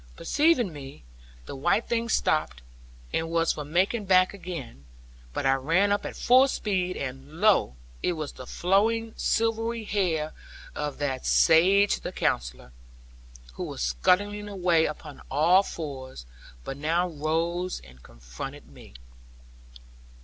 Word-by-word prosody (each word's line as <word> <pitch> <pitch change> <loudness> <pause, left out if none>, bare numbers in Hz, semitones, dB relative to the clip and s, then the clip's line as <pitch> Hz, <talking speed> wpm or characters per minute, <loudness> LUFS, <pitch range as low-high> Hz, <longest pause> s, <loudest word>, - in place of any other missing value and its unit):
Perceiving 280 - +2
me, 140 - -10 0.4
the - - -7
white 175 - +1
thing 235 0 -1
stopped, 155 - 0 0.5
and 165 0 -1
was 165 0 +1
for 150 - -6
making 185 +8 0
back 185 0 +4
again; 165 - -8 0.5
but - - -3
I 135 - +5
ran 165 +10 +2
up 205 0 0
at - - -8
full 255 +2 +5
speed; 185 -8 -2
and 135 +2 -6
lo, 185 - +3 0.3
it 180 - 0
was 155 -3 -5
the 130 - -11
flowing 220 +5 +1
silvery 225 0 0
hair 170 -7 -1 0.4
of 150 -1 -4
that 135 -3 -3
sage 195 +5 +4
the - - -6
Counsellor, 60 0 -2 0.8
who - - -6
was - - -5
scuttling 205 - +1
away 175 -5 +2
upon 150 -2 -8
all 170 +7 +4
fours; 135 - -7 0.4
but 135 - -6
now 165 +5 +1
rose 170 +3 -2
and 65 -1 -17
confronted - - -9
me. - - -15
170 Hz, 135 wpm, -26 LUFS, 140-200 Hz, 0.8 s, I